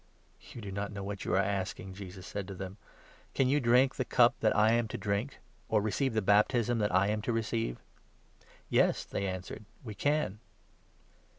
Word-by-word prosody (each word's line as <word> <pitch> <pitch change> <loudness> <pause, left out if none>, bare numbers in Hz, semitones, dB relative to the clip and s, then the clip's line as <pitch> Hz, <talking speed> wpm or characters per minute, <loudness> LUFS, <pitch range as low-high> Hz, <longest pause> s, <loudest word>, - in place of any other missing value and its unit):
" - - -19
"You 120 - -8
do 100 -2 -6
not 100 +1 -3
know 100 -1 -6
what 100 0 -5
you - - +1
are 95 - +4
asking," 95 -1 -3
Jesus 95 -1 -9
said 100 -1 -5
to 95 - -7
38 - - -13
them. 95 +1 -7 0.6
"Can 135 - +3
you 145 +2 +3
drink 125 +1 +4
the 130 - +1
cup 120 -1 +4
that 110 - +2
I 110 +1 +5
am 115 0 +2
to - - -5
drink? 105 +6 -2 0.3
or 110 - +3
receive 110 +4 0
the 110 - +1
baptism 115 +4 +3
that 105 -1 +1
I 95 +2 +3
am 105 0 0
to 120 - -2
receive? 115 - -1 0.5
" - - -35 0.3
"Yes," - - +3
they 100 - -3
answered, 95 +3 -5 0.2
"we 110 -4 -6
can." 145 -5 0
105 Hz, 205 wpm, -31 LUFS, 100-120 Hz, 0.6 s, I